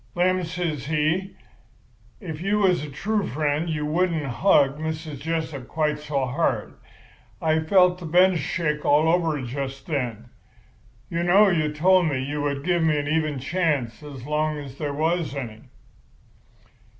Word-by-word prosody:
"'Lem,' 185 +1 +2
says 165 -5 -3
he, 160 +5 0 0.8
'if 160 -6 -7
you 200 +3 +1
was 185 -6 +2
a 150 - -6
true 205 +9 -1
friend 150 +3 -1
you 150 -2 -2
wouldn't 165 0 0
hug 140 0 +3
Mrs. 155 -2 -5
Jessup 160 -4 -3
quite 150 -1 -1
so 145 -3 -1
hard. 130 -4 -1 0.7
I 160 0 +2
felt 180 +2 +3
the 170 - -7
bench 180 +2 +4
shake 150 -1 -2
all 150 +2 +4
over 165 -3 +2
just 135 +2 -5
then. 125 -6 -3 0.8
You 170 - -1
know 195 +4 +5
you 155 -4 +1
told 180 +3 +4
me 140 -4 0
you 145 +3 -3
would 140 -1 -2
give 175 0 +1
me 155 -2 +2
an 145 0 -2
even 155 -1 0
chance 135 -6 -1
as 140 -4 -9
long 150 +1 0
as 140 -2 -9
there 145 -2 -2
was 160 0 -1
any. 115 -6 -6
155 Hz, 155 wpm, -24 LUFS, 145-175 Hz, 0.8 s, know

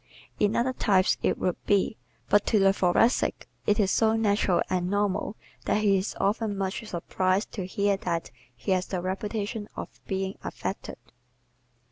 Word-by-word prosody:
In 205 0 +2
other 255 +2 +1
types 195 -6 +3
it - - +1
would 180 - -2
be, 200 -9 +2 0.3
but 205 0 +4
to 220 - +3
the 195 -1 +5
Thoracic 195 +6 +2 0.2
it 210 +1 +3
is 200 -2 +3
so 220 -1 +3
natural 205 -4 +2
and 180 -1 -1
normal 205 +1 0 0.3
that 215 - +1
he 200 -2 +4
is 190 +1 -1
often 205 0 0
much 195 +3 -2
surprised 185 0 -1
to 190 -5 -4
hear 200 +1 +1
that 170 -3 -3 0.2
he 125 +11 -3
has 185 0 +1
the 185 - -2
reputation 205 +3 -3
of - - -8
being 190 0 -2
"affected." - - -5
200 Hz, 160 wpm, -27 LUFS, 185-210 Hz, 0.3 s, the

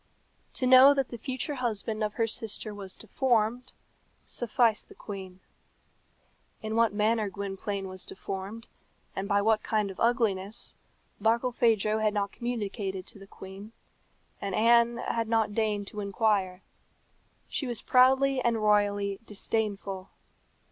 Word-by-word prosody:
To 255 - -1
know 260 +2 +8
that 275 -1 0
the 235 - -6
future 260 +5 -3
husband 220 -4 -2
of 210 0 -2
her 230 - +2
sister 220 -1 -3
was 195 -2 -7
deformed, 240 +1 0 0.5
sufficed 235 -2 +1
the - - -14
queen. 190 -2 -8 1.2
In 220 0 -3
what 230 -1 +4
manner 215 +1 +1
Gwynplaine 200 0 -4
was 185 0 -6
deformed, 195 +4 -6 0.5
and 195 +1 -3
by 200 -1 +2
what 220 0 +3
kind 210 -3 0
of 190 - -12
ugliness, 220 -4 0 0.5
Barkilphedro 225 -2 +2
had 215 -1 +1
not 200 -1 0
communicated 205 -5 -4
to 215 -1 -9
the 195 - -13
queen, 195 +3 -11 0.7
and 200 - -2
Anne 235 +1 +4
had 230 -1 -2
not 225 -2 +1
deigned 210 -2 0
to 210 - -7
inquire. 200 -2 0 0.8
She 275 - -3
was 240 -2 -3
proudly 265 +1 +4
and 235 -1 +2
royally 205 -2 +2
disdainful. 200 -2 -2
215 Hz, 135 wpm, -28 LUFS, 200-235 Hz, 1.2 s, know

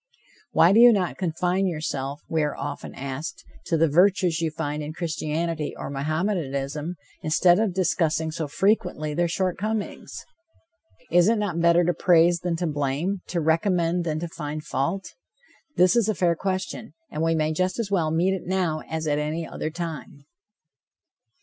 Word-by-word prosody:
"Why 170 +3 +5
do 220 - +6
you 240 0 +9
not 190 -5 0
confine 180 +2 0
yourself," 145 -4 -3
we 160 -1 0
are 150 -1 -1
often 145 0 -6
asked, 140 +3 -6 0.2
"to 165 - +1
the 165 +1 +4
virtues 180 +1 +3
you 165 - +1
find 150 -1 -4
in 150 +1 -5
Christianity 160 -1 -2
or - - -6
Mohammedanism, 150 0 -2 0.3
instead 175 +4 +4
of 215 -5 0
discussing 160 -3 +1
so 160 -1 -3
frequently 175 -3 0
their 175 +3 +1
short 180 +1 -1
comings? 215 +1 -4 0.9
Is 175 +3 +5
it 230 - +3
not 190 -5 -1
better 170 +1 +5
to 175 +1 +1
praise 170 -1 +4
than 175 -1 -1
to 175 +2 -2
blame, 150 +5 -1
to 175 - -2
recommend 170 +1 +1
than 155 -2 -2
to 170 - -3
find 150 -2 -6
fault?" 170 +10 -2 0.6
This 180 +5 +4
is 230 -3 +3
a 215 - +1
fair 170 0 +2
question, 190 +4 -4 0.2
and 155 - -3
we 165 0 +2
may 155 0 0
just 185 +3 0
as 225 -4 -3
well 170 -5 +2
meet 170 +4 +2
it 190 - -5
now 180 -4 0
as 160 0 -3
at 150 -1 +1
any 155 +2 -3
other - - -4
time. 160 -4 -7
165 Hz, 170 wpm, -25 LUFS, 155-185 Hz, 0.9 s, you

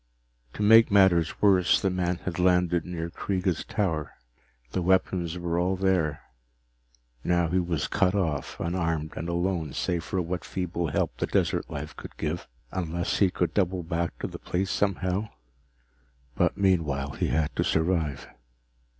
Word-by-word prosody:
To 105 - -3
make 110 +2 +7
matters 95 -5 +3
worse, 95 -3 +5
the 95 - 0
man 90 -1 0
had 90 -1 -3
landed 90 -2 +3
near 85 -1 -4
Kreega's 95 -2 -1
tower. 90 -10 -2 0.6
The 95 - -1
weapons 90 -1 +1
were 85 -1 -1
all 90 +2 +1
there 90 -6 +1 1.0
now 85 -1 +2
he 90 +2 +2
was 85 -4 -1
cut 100 -1 +2
off, 80 -8 -2
unarmed 85 -3 -1
and 85 - -4
alone 85 -3 -1
save 85 -2 -1
for 95 - -2
what 90 0 -3
feeble 85 -2 -3
help 75 - -1
the - - -1
desert - - 0
life 75 +1 -6
could - - -10
give. 80 +2 -3 0.2
Unless 85 0 -2
he 100 - +5
could 90 -2 -1
double 95 -2 0
back 85 0 -2
to - - -4
the - - -8
place 95 +1 -2
somehow 100 +1 0 1.0
but - - +1
meanwhile 80 -8 +1
he - - -2
had 80 -1 0
to - - +1
survive. 80 -4 0
90 Hz, 155 wpm, -27 LUFS, 80-95 Hz, 1.0 s, make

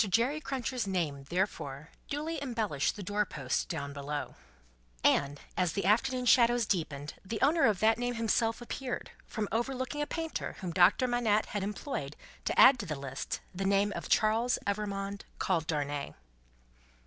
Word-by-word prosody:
Jerry 245 - +2
Cruncher's 255 -5 -2
name, 155 -8 -1
therefore, 160 -5 -2 0.2
duly 305 +1 -3
embellished 220 - -1
the 205 - -6
doorpost 190 -9 -1
down 140 0 -4
below; 145 +1 -4 0.7
and, 140 0 +3 0.2
as 180 -3 +1
the 200 - -1
afternoon 250 +5 +2
shadows 240 -1 +5
deepened, 150 -7 -2
the 215 +3 -4
owner 320 +4 +5
of 210 -5 +2
that 220 +1 +4
name 245 0 -1
himself 230 0 +1
appeared, 250 +1 -4 0.2
from 215 -2 -3
overlooking 260 +5 -1
a 295 - -1
painter 325 -1 -3
whom 180 -2 -3
Doctor 185 +8 +5
Manette 230 -3 +2
had 205 - -3
employed 195 - -4 0.3
to - - 0
add 255 -1 +9
to 205 - -4
the 155 - -2
list 135 -1 -4
the 190 +2 -3
name 200 +1 +2
of - - -5
Charles 225 +3 +3
Evrémonde, 200 -1 -2 0.2
called 165 -4 0
Darnay. 145 -2 -2
205 Hz, 155 wpm, -31 LUFS, 170-245 Hz, 0.7 s, add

